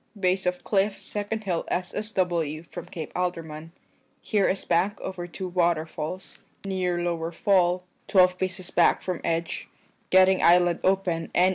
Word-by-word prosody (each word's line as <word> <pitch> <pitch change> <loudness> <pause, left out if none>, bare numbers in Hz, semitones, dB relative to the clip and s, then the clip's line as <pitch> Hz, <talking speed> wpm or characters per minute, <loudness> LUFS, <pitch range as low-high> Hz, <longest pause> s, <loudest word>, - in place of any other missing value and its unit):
Bayse 185 -1 +1
of 180 0 -1
cliff 200 0 +1
second 210 +1 -4
hill 180 -4 -1
S.S.W. 180 -5 -1
from 175 0 -9
Cape 160 -4 -7
Alderman. 165 -3 -3 0.5
Here 205 -3 +1
is 190 - -2
bank 185 +4 +1
over 175 -2 -5
2 185 +2 -6
waterfals. 170 0 -1 0.3
Neer 185 -2 -1
lower 170 -1 -2
fall, 180 0 +2 0.2
12 185 -1 +4
paces 185 -1 -3
back 170 - +3
from 180 -3 -2
egge, 165 0 -2 0.4
getting 190 0 +5
island 175 0 +5
open 185 -4 +1
N.E. 180 +1 +5
180 Hz, 140 wpm, -26 LUFS, 170-190 Hz, 0.5 s, getting